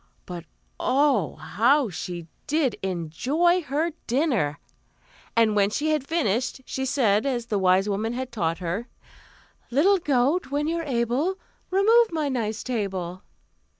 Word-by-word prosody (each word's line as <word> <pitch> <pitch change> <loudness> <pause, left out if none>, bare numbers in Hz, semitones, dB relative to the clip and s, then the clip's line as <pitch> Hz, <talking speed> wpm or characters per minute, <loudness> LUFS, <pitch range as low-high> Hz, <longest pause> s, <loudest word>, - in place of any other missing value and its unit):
But 175 -2 -7 0.3
oh, 265 - +2
how 245 - +2
she 175 0 -5 0.2
did 285 -6 +1
enjoy 245 - +1
her 310 +3 -1 0.2
dinner! 240 - +1 0.8
and 225 -2 +4
when 200 -1 +3
she 300 +8 0
had 300 -3 -1
finished, 260 - 0
she 265 0 -3
said, 220 -6 +2
as 250 -4 -1
the 210 -4 -1
wise 190 +1 +3
woman 210 +3 -1
had 255 +1 -4
taught 165 -8 -1
her: 180 +8 -3 0.8
"Little 370 +10 +4
goat, 285 +2 +1
when 290 +2 -1
you're 335 +1 -1
able, 270 +6 0 0.3
Remove 440 +4 +4
my 310 -3 -1
nice 220 -5 -2
table." 190 -7 -3
245 Hz, 135 wpm, -25 LUFS, 200-300 Hz, 0.8 s, and